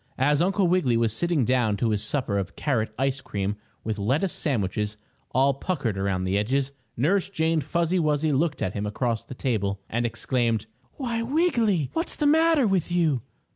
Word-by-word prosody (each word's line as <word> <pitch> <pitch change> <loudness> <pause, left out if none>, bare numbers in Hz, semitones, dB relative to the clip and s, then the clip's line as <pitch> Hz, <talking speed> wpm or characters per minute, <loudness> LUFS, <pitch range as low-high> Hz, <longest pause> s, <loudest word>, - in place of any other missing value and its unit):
As 145 +3 +3
Uncle 190 +1 +2
Wiggily 170 -10 +2
was 115 -2 +1
sitting 170 -1 +1
down 120 -5 +2
to 115 +2 +1
his 105 -1 0
supper 115 -8 -1
of 95 - -5
carrot 115 -7 0
ice 135 +1 0
cream 105 -6 -2 0.3
with 110 -1 -3
lettuce 140 - +1
sandwiches 105 - -1 0.3
all 135 +2 +3
puckered 135 - -2
around 95 -1 -1
the 95 +2 +1
edges, 135 +6 0 0.3
Nurse 180 +10 +2
Jane 160 -4 +1
Fuzzy 170 +5 0
Wuzzy 155 -1 +1
looked 150 +2 0
at 95 - -1
him 105 0 -3
across 115 +1 -1
the 130 - -9
table, 100 -6 -1
and 120 +2 -1
exclaimed: 120 -1 0 0.3
"Why, 235 -4 -2
Wiggy! 230 - +1
What's 330 +2 -2
the 300 - -1
matter 320 -1 +4
with 190 -4 +1
you?" 160 -8 +2
135 Hz, 175 wpm, -25 LUFS, 110-175 Hz, 0.3 s, matter